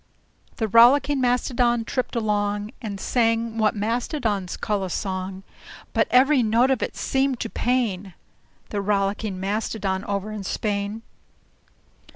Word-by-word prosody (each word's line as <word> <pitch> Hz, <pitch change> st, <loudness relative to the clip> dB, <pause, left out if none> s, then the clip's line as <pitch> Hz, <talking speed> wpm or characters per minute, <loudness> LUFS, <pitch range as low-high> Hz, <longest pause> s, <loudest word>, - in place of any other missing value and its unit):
The 220 Hz, -, -1 dB
Rollicking 265 Hz, +6 st, +5 dB
Mastodon 245 Hz, -1 st, +1 dB
tripped 255 Hz, +1 st, -3 dB
along, 210 Hz, -1 st, -1 dB
And 205 Hz, -4 st, -5 dB
sang 230 Hz, 0 st, 0 dB
what 215 Hz, -1 st, +2 dB
Mastodons 220 Hz, -, -2 dB
call 205 Hz, -2 st, -1 dB
a 185 Hz, -, -3 dB
song; 185 Hz, +1 st, -4 dB, 0.5 s
But -, -, +2 dB
every 265 Hz, +2 st, +5 dB
note 235 Hz, +4 st, +3 dB
of 265 Hz, -, +1 dB
it -, -, -3 dB
seemed 265 Hz, -2 st, 0 dB
to 230 Hz, -, -4 dB
pain 205 Hz, -7 st, -1 dB, 0.5 s
The 205 Hz, -, -2 dB
Rollicking 200 Hz, 0 st, -1 dB
Mastodon 195 Hz, -1 st, -2 dB
over 200 Hz, +1 st, -3 dB
in 210 Hz, -2 st, -5 dB
Spain. 205 Hz, +2 st, -2 dB
220 Hz, 130 wpm, -24 LUFS, 200-245 Hz, 0.5 s, Rollicking